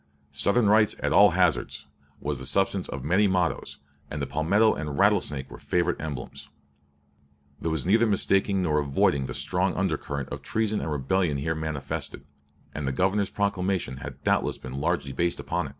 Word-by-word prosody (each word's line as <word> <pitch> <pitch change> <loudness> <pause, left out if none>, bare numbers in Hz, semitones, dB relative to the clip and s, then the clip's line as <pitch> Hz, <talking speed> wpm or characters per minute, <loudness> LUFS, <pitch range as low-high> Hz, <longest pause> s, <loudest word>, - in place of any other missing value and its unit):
"Southern 110 +2 +2
rights 105 +1 +4
at - - 0
all 100 0 +8
hazards," 90 -8 +1 0.3
was 70 -2 -3
the 65 - -6
substance 95 +5 0
of 65 - -5
many 95 +8 +3
mottoes, 90 -3 -1 0.3
and 75 - -5
the 70 - -1
palmetto 90 +11 +2
and 75 - -4
the - - -3
rattlesnake 70 -1 +2
were - - -9
favorite 90 -1 0
emblems. 75 -5 -6 1.1
There 80 - -1
was 80 -3 0
neither 110 +5 +4
mistaking 95 -1 +2
nor 75 -3 +2
avoiding 70 -1 +1
the 60 - -6
strong 90 +1 0
undercurrent 75 -7 -2
of - - -6
treason 110 -1 -1
and 80 - -3
rebellion 75 +2 0
here 80 +4 -1
manifested, 80 -3 -4 0.5
and 75 -2 -4
the - - +1
Governor's 95 +7 +1
proclamation 95 -8 -1
had 65 - -9
doubtless - - +1
been 65 +2 -7
largely 70 - -1
based 85 +5 -1
upon - - -2
it. - - -9
85 Hz, 175 wpm, -26 LUFS, 70-95 Hz, 1.1 s, all